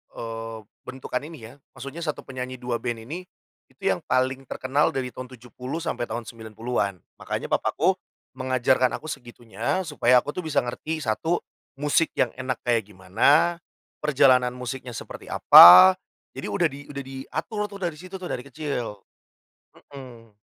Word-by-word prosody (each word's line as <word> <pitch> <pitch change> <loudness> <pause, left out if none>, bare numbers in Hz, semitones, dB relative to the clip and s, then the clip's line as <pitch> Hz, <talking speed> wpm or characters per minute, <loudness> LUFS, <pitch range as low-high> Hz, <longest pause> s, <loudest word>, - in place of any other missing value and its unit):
eee, 115 -1 -6 0.3
bentukan 130 -1 -4
ini 160 -1 -10
ya, - - -16 0.2
maksudnya 140 +5 -8
1 150 - -3
penyanyi 130 -1 -6
2 125 -1 -3
band 120 -2 -4
ini, 170 +9 -7 0.4
itu - - -31
yang - - -1
paling 130 +1 0
terkenal 135 +3 0
dari 130 -1 -2
tahun 130 0 -8
70 125 +6 -7
sampai 120 -7 -2
tahun 115 +2 -4
90-an. 110 -2 -4 0.2
Makanya - - -4
papaku - - +1 0.4
mengajarkan 130 0 +1
aku 155 - -8
segitunya, 120 - -4
supaya 125 -6 +3
aku - - -8
tuh 180 0 -6
bisa 150 -2 +1
ngerti 155 +6 -4
1, 160 +10 -1 0.4
musik 150 +3 +2
yang 125 - +2
enak 130 -1 -3
kayak 115 -4 +1
gimana, 130 - +3 0.4
perjalanan 130 -4 +4
musiknya 125 0 -6
seperti - - -9
apa, 90 +2 +10 0.4
jadi - - -5
udah - - +2
di 140 +1 -10
udah 140 -1 -6
diatur 150 - -6
tuh 200 -1 -10
dari 170 -4 -3
situ 185 +3 -10
tuh, 180 - -6
dari 125 - -3
kecil. 135 -8 -5 0.9
Mhm. 120 -5 -12
130 Hz, 155 wpm, -25 LUFS, 120-145 Hz, 0.9 s, apa